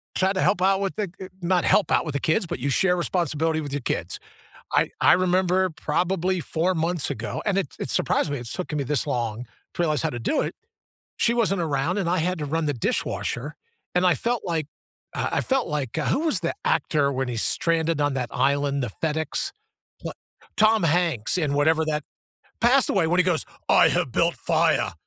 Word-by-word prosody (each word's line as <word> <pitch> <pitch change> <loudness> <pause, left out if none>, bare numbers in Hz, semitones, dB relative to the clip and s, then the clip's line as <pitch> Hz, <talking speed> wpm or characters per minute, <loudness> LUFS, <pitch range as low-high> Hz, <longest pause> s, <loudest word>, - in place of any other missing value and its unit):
try 190 +1 +2
to 190 - -1
help 180 - +2
out 190 +1 +3
with 195 -1 -2
the 205 -5 -3
eh, 190 - -7
not 175 0 +1
help 210 - +3
out - - +3
with 150 - -4
the 140 - -1
kids, 170 +7 +1
but 165 - -5
you 140 +3 -1
share 180 +6 +2
responsibility 165 -3 0
with 145 -2 -6
your 145 - -2
kids. - - -3 0.5
I - - +3
I - - +6
remember 185 +1 +2
probably 180 +3 -1
4 170 +4 0
months 165 -1 -1
ago, 115 +1 -4
and 200 -2 +1
it 195 - 0
it - - -4
surprised - - +1
me, 145 - -2
it's 120 -1 -6
taken 170 -4 -4
me 140 - 0
this 145 +1 -1
long 120 -3 -2 0.3
to - - -2
realize 155 -5 +1
how - - 0
to 120 - -5
do 115 - 0
it. - - -3 0.6
She 235 - +2
wasn't 205 -6 +1
around 155 +3 -1
and 190 -4 0
I 180 - +1
had 180 +2 -1
to 150 - -3
run 160 +2 -1
the 145 - 0
dishwasher, 130 +3 -2 0.4
and 180 +1 +3
I 175 - +4
felt 235 - -1
like, 165 -4 -1 0.5
uh, - - -1
I - - +2
felt 265 -5 0
like, 145 -4 -3
uh, 155 - 0
who - - +1
was 310 - 0
the 170 -1 -2
actor 145 -3 +1
when 130 -1 -2
he's 120 -2 -1
stranded 165 -2 +1
on 145 -1 +1
that 125 -3 -2
island, 140 0 +1
the 120 - -3
FedEx, 160 0 -1 0.5
pl - - -5 0.4
Tom 220 0 +4
Hanks 165 -7 +1
and 150 -5 0
whatever 160 +2 +2
that 150 -1 -1 0.6
passed 250 +3 +4
away 190 -4 +2
when 175 +3 +2
he - - +5
goes, 180 -3 0 0.2
"I - - +6
have - - 0
built - - +2
fire." - - +1
165 Hz, 215 wpm, -24 LUFS, 145-185 Hz, 0.6 s, I